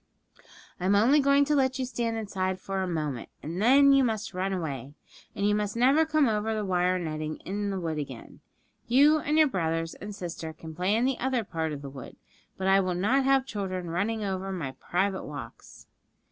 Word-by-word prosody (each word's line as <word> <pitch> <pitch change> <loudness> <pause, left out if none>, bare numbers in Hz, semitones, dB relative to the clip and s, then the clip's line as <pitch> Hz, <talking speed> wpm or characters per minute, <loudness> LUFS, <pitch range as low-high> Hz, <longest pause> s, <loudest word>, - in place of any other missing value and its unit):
'I 180 - -3
am 200 - +4
only 245 +9 +5
going 280 0 +4
to 300 - +1
let 265 -2 +2
you 260 - -1
stand 235 -2 -2
inside 190 -3 -2
for 195 -1 -3
a 190 - -1
moment, 150 -8 -3
and 170 +5 -4
then 275 +4 +6
you 275 -1 +5
must 220 -4 -2
run 185 +2 -1
away. 145 -6 -4 0.4
And 200 - 0
you 210 - +3
must 210 +1 -1
never 275 +6 +4
come 310 -3 +3
over 220 0 0
the 215 -1 -2
wire 180 -1 +1
netting 155 -2 -4
in 205 +2 -2
the 195 -1 -2
wood 160 -3 -3
again. 135 -5 -8 0.5
You 285 +6 +5
and 300 +1 0
your 315 - +7
brothers 165 - -1
and 205 0 -8
sister 165 -3 -6
can 160 0 -10
play 180 +5 0
in 235 +2 +2
the 265 -1 0
other 255 -2 0
part 160 -5 -3
of 145 -1 -6
the 140 - -6
wood, 135 -1 -10 0.4
but 190 - -3
I 195 0 +5
will 185 -2 0
not 250 +9 +2
have 270 -1 +3
children 185 -7 -4
running 210 +5 -1
over 195 -1 -3
my 165 -8 -4
private 190 +7 -2
walks.' 140 -6 -10
195 Hz, 210 wpm, -28 LUFS, 170-245 Hz, 0.5 s, your